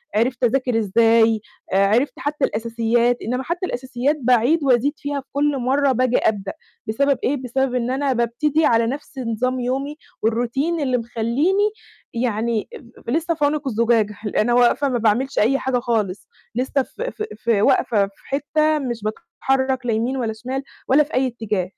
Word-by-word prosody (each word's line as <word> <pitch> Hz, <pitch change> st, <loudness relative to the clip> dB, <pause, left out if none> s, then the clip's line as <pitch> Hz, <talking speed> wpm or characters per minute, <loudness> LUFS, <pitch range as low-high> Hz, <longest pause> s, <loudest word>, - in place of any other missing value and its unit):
عِرفت 245 Hz, +3 st, 0 dB
أذاكر 250 Hz, -1 st, +2 dB
إزاي، 225 Hz, +1 st, +3 dB, 0.3 s
آآ 195 Hz, +1 st, +4 dB
عِرفت 240 Hz, +7 st, +2 dB
حتى 290 Hz, 0 st, 0 dB
الأساسيات 230 Hz, +2 st, 0 dB
إنّما 250 Hz, +3 st, -2 dB
حتى 350 Hz, +4 st, -2 dB
الأساسيات 260 Hz, +2 st, -1 dB
باعيد 255 Hz, +6 st, +3 dB
وأزيد 265 Hz, +2 st, +3 dB
فيها 285 Hz, -1 st, -3 dB
في -, -, -31 dB
كل 285 Hz, 0 st, +1 dB
مرّة 270 Hz, +2 st, +2 dB
بآجي 255 Hz, 0 st, +2 dB
أبدأ، 200 Hz, -3 st, 0 dB, 0.3 s
بسبب 275 Hz, +4 st, +1 dB
إيه 285 Hz, +2 st, +1 dB
بسبب 255 Hz, +1 st, -1 dB
إن 245 Hz, 0 st, 0 dB
أنا 270 Hz, 0 st, 0 dB
بابتدي 275 Hz, +7 st, +1 dB
على 230 Hz, -2 st, +3 dB
نَفْس 280 Hz, +1 st, -6 dB
نظام 255 Hz, +2 st, -1 dB
يومي 270 Hz, +4 st, -2 dB, 0.2 s
والروتين 245 Hz, +9 st, 0 dB
اللي 260 Hz, -3 st, +1 dB
مخلّيني 245 Hz, -, +1 dB, 0.4 s
يعني 230 Hz, -2 st, -1 dB
ب 240 Hz, -2 st, -18 dB
ب -, -, -3 dB
لسه 330 Hz, +5 st, 0 dB
في 295 Hz, -2 st, +1 dB
عنق 295 Hz, -1 st, -1 dB
الزجاجة 225 Hz, -3 st, +1 dB
ال 210 Hz, -, -4 dB
أنا 240 Hz, +3 st, +2 dB
واقفة 245 Hz, +3 st, +3 dB
ما 250 Hz, -, 0 dB
باعملش 235 Hz, +5 st, +1 dB
أي 265 Hz, +6 st, +3 dB
حاجة 255 Hz, -2 st, 0 dB
خالص، 220 Hz, -6 st, -2 dB, 0.3 s
لسه 260 Hz, +2 st, 0 dB
ف -, -, -13 dB
ف -, -, -4 dB
في 230 Hz, -4 st, +1 dB
واقفة 210 Hz, -1 st, +3 dB
في 195 Hz, -, -21 dB
حتة 305 Hz, +2 st, +1 dB
مش 240 Hz, -5 st, -4 dB
باتحرّك 260 Hz, +4 st, -1 dB
لا 230 Hz, -, +1 dB
يمين 240 Hz, +5 st, -1 dB
ولا 230 Hz, -4 st, -2 dB
شمال 255 Hz, +5 st, -5 dB, 0.3 s
ولا 280 Hz, +3 st, +6 dB
في 295 Hz, -, -14 dB
أي 260 Hz, +1 st, +2 dB
اتّجاه. 220 Hz, -6 st, -2 dB
250 Hz, 175 wpm, -21 LUFS, 230-275 Hz, 0.4 s, ولا